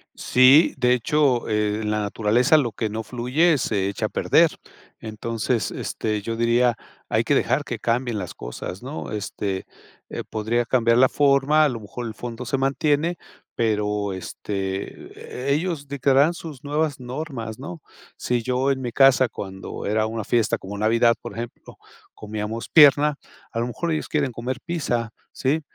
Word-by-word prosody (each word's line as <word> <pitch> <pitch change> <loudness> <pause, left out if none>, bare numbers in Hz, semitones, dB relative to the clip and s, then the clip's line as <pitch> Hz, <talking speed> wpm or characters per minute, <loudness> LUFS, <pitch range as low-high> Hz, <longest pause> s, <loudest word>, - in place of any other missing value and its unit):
Sí, 130 +6 +5
de 125 0 +3
hecho, 130 0 +1
eh, 105 0 0
en 105 -1 -2
la 105 0 0
naturaleza 115 +8 +3
lo 125 -6 +1
que 110 +1 -3
no 110 +2 -4
fluye 130 +8 +2
se 100 -6 0
echa 100 - -2
a - - -13
perder. - - +4 0.5
Entonces, 115 +2 -2
este, 105 -1 -3
yo 115 +2 -3
diría: 120 +1 +2 0.3
"Hay - - +2
que - - +2
dejar - - +1
que - - -5
cambien 120 -1 -1
las 90 -4 -5
cosas", 75 - -7
¿no? 140 +4 -6
Este, 100 -2 -3 0.4
eh, - - -5
podría 115 +2 0
cambiar 115 -1 +3
la 130 +1 +6
forma, 145 +2 +3
a 150 - +4
lo 120 -3 -4
mejor 110 +3 -7
el 110 - -6
fondo 120 +2 -7
se 135 - -1
mantiene, 145 +5 +1 0.4
pero, 105 -2 0
este, 95 +6 -6
e - - +4
ellos 155 -2 -2
dictarán 140 +3 +3
sus 155 -6 -9
nuevas 145 -1 -1
normas, 125 -3 -6
¿no? 165 +4 -8 0.4
Sí, 120 -1 -1
yo 130 +3 0
en 135 -1 -2
mi 120 -2 -3
casa, 135 0 +5
cuando 95 -3 -7
era 110 +1 +1
una 110 0 -3
fiesta 115 -1 +1
como 100 +2 -8
Navidad, 115 +3 +3
por - - -8
ejemplo, 120 +2 -8 0.4
comíamos 105 +2 -5
pierna, 150 -1 +6 0.4
a 115 - -3
lo 120 - -1
mejor 165 +8 -3
ellos 155 - -2
quieren 145 -4 0
comer 125 +2 -4
pizza, 125 -9 -2 0.2
¿sí? 145 +4 0
120 Hz, 170 wpm, -23 LUFS, 110-140 Hz, 0.5 s, la